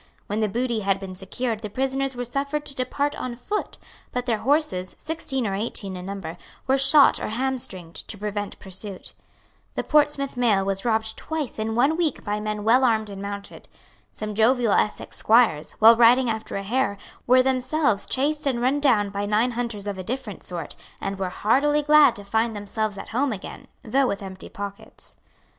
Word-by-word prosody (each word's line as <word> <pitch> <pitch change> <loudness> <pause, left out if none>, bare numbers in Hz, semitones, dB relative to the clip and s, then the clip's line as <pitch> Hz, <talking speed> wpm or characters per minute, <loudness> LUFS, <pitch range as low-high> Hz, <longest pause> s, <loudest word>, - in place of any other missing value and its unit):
When 210 +2 -2
the 215 -1 +1
booty 235 +1 -1
had 195 -1 0
been 190 -1 -7
secured 220 +5 -3
the 215 -1 -6
prisoners 270 +3 -1
were 245 0 -3
suffered 280 +4 -2
to 280 - -5
depart 285 +3 -1
on 250 -1 -5
foot; 415 - -4 0.3
but 250 0 -2
their 230 -4 0
horses, 265 - 0
sixteen 300 -5 -2
or 200 - -1
eighteen 195 -2 -1
in 180 0 -7
number, 185 -4 -6 0.3
were 270 +1 +2
shot 275 +2 +6
or - - -3
hamstringed, 220 -8 -3
to 210 - -5
prevent 205 0 -4
pursuit. 190 +1 -7 0.6
The - - -1
Portsmouth 295 -2 +2
mail 220 -6 +2
was 195 0 -1
robbed 220 -1 0
twice 310 -8 -4
in 220 +1 -2
one 275 +7 +3
week 335 -3 0
by 210 0 -1
men 210 0 -3
well 240 +5 +4
armed 220 -4 +2
and 195 -1 -7
mounted. 200 0 -7 0.4
Some 215 0 -5
jovial 230 +1 +3
Essex 210 - 0
squires, 220 -10 +3
while 225 +2 +7
riding 240 +1 +5
after 220 0 -5
a 195 - -3
hare, 225 0 0 0.3
were 255 +1 +6
themselves 260 -3 +1
chased 290 +2 0
and 255 -3 0
run 260 +4 +1
down 220 -8 +3
by 200 0 -3
nine 220 +4 +2
hunters 230 -4 -4
of 200 -2 -4
a - - -4
different 235 -1 -5
sort, 175 -2 -5 0.2
and 195 0 -4
were 190 -1 -1
heartily 290 +10 +2
glad 300 0 +6
to 205 - -8
find 225 +2 0
themselves 205 0 -3
at - - -8
home 260 +4 0
again, 200 -4 -7 0.2
though 265 +4 +2
with 200 -3 -3
empty 190 -1 -9
pockets. 200 0 -9
225 Hz, 190 wpm, -24 LUFS, 200-265 Hz, 0.6 s, while